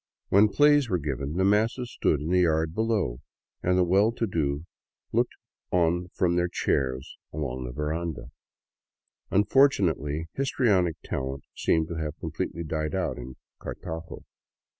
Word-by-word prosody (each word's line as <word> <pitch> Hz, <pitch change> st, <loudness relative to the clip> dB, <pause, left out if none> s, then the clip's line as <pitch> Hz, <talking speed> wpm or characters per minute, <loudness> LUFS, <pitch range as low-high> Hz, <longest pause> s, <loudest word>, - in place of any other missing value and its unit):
When 100 Hz, +2 st, +6 dB
plays 145 Hz, +1 st, +4 dB
were 90 Hz, -, +2 dB
given, 70 Hz, -2 st, -3 dB
the 95 Hz, +3 st, +1 dB
masses 115 Hz, +4 st, +1 dB
stood 75 Hz, -, +1 dB
in 80 Hz, +4 st, -3 dB
the 90 Hz, -, +4 dB
yard 80 Hz, -1 st, +2 dB
below 105 Hz, -, 0 dB, 0.4 s
and 90 Hz, +1 st, +2 dB
the 90 Hz, -, +5 dB
well 100 Hz, +5 st, +4 dB
to 115 Hz, -, -1 dB
do 75 Hz, -5 st, -1 dB, 0.5 s
looked -, -, +1 dB, 0.3 s
on 85 Hz, 0 st, +2 dB
from 85 Hz, -2 st, +2 dB
their 90 Hz, 0 st, +2 dB
chairs 65 Hz, -6 st, -1 dB
along 65 Hz, -4 st, -4 dB
the -, -, -5 dB
veranda. 75 Hz, -1 st, -3 dB, 1.0 s
Unfortunately, 95 Hz, -, +3 dB
histrionic 105 Hz, -, +2 dB
talent 65 Hz, +1 st, -4 dB
seemed 80 Hz, -1 st, +1 dB
to 85 Hz, -, -4 dB
have 75 Hz, -2 st, -4 dB
completely 85 Hz, -, -4 dB
died 75 Hz, -1 st, -2 dB
out -, -, -1 dB
in 65 Hz, +1 st, -8 dB, 0.3 s
Cartago. 80 Hz, 0 st, -7 dB
85 Hz, 140 wpm, -27 LUFS, 75-100 Hz, 1.0 s, When